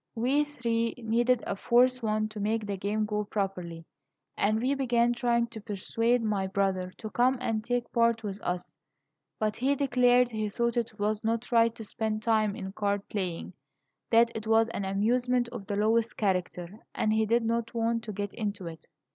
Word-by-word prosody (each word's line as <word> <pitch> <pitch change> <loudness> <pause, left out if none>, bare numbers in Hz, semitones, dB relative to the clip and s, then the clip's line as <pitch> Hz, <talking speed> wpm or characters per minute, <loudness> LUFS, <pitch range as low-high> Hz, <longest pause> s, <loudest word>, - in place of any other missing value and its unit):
We 265 +6 +2
three 230 -5 -1
needed 240 +1 +1
a - - -2
fourth 250 +4 +3
one 215 -1 0
to 215 0 -8
make 215 +1 0
the 200 -1 -2
game 205 +3 -1
go 210 0 -1
properly, 185 -5 -4 0.5
and 215 +2 +1
we 255 +4 +1
began 240 -3 +2
trying 235 -1 +1
to 225 -2 -9
persuade 230 +3 0
my 205 -3 0
brother 190 -1 0
to 215 -2 -7
come 255 +2 +3
and 225 -3 -1
take 245 0 -2
part 230 -1 +2
with 200 -1 -5
us; 180 0 -4 0.6
but 215 -1 -1
he 270 +4 +2
declared 250 -2 +3
he 215 -1 -2
thought 235 +3 -1
it 230 -3 -2
was 210 +1 -1
not 230 +2 -1
right 230 -1 +4
to 225 - -8
spend 215 0 -3
time 215 -3 +2
in 190 -4 -6
card 200 0 -1
playing 185 -3 -3 0.6
that 230 0 +5
it 220 0 -5
was 225 0 +4
an 200 -3 -3
amusement 240 +5 +1
of 235 -5 -8
the 205 - -2
lowest 220 +2 +1
character, 185 -1 -2 0.2
and 215 - +1
he 220 0 +2
did 230 +2 +2
not 230 +1 -1
want 230 0 +1
to 215 - -4
get 205 0 -4
into 205 -4 -4
it. 165 -1 -9
220 Hz, 190 wpm, -29 LUFS, 205-235 Hz, 0.6 s, that